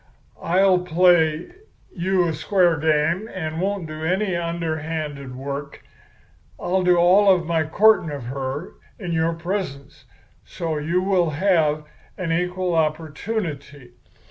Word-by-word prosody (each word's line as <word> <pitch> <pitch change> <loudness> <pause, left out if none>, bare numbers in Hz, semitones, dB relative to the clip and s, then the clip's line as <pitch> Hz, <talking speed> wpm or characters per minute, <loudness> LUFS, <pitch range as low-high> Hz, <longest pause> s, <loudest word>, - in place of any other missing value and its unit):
I'll 185 +1 +3
play 175 - +2 0.4
you 185 0 +1
a 165 - -1
square 175 +2 +2
game, 160 +7 +1
and 160 -2 -4
won't 195 -2 -1
do 155 0 -7
any 185 +3 0
underhanded 160 -5 -4
work. 140 +2 -6 0.8
I'll 185 +1 0
do 180 -1 +4
all 185 +4 +5
of 180 -3 +2
my 165 -1 0
courting 210 0 +4
of 145 -3 -6
her 135 +5 -5 0.3
in 180 -5 -5
your 165 0 +1
presence, 170 -5 -5 0.4
so 160 -3 -4
you 170 +5 0
will 185 -4 +2
have 155 -2 +1 0.3
an 180 -3 -3
equal 180 +1 -1
opportunity. 155 - -3
165 Hz, 125 wpm, -22 LUFS, 155-185 Hz, 0.8 s, all